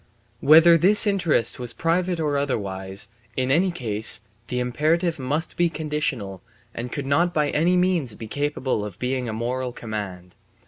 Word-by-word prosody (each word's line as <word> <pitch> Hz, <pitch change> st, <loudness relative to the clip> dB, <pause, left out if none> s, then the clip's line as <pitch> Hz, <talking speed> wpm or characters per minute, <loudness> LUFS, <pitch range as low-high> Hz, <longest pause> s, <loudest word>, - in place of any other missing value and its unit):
Whether 165 Hz, +3 st, +7 dB
this 205 Hz, +6 st, +5 dB
interest 175 Hz, -, +1 dB
was 120 Hz, -1 st, -2 dB
private 170 Hz, +6 st, 0 dB
or 150 Hz, -2 st, 0 dB
otherwise, 95 Hz, -9 st, -3 dB, 0.3 s
in 130 Hz, 0 st, 0 dB
any 175 Hz, +7 st, +3 dB
case 110 Hz, -, 0 dB, 0.3 s
the 125 Hz, -, -3 dB
imperative 155 Hz, +7 st, 0 dB
must 150 Hz, +6 st, -2 dB
be 175 Hz, -1 st, +3 dB
conditional 150 Hz, -, -3 dB, 0.3 s
and 120 Hz, +1 st, -6 dB
could 145 Hz, -2 st, -4 dB
not 170 Hz, +6 st, +1 dB
by 150 Hz, -2 st, +1 dB
any 175 Hz, +4 st, +2 dB
means 175 Hz, -, +1 dB
be 110 Hz, -, -8 dB
capable 140 Hz, -3 st, -2 dB
of 100 Hz, -3 st, -7 dB
being 125 Hz, 0 st, -2 dB
a -, -, -3 dB
moral 125 Hz, +3 st, -2 dB
command. 100 Hz, -6 st, -6 dB
140 Hz, 155 wpm, -23 LUFS, 115-165 Hz, 0.3 s, Whether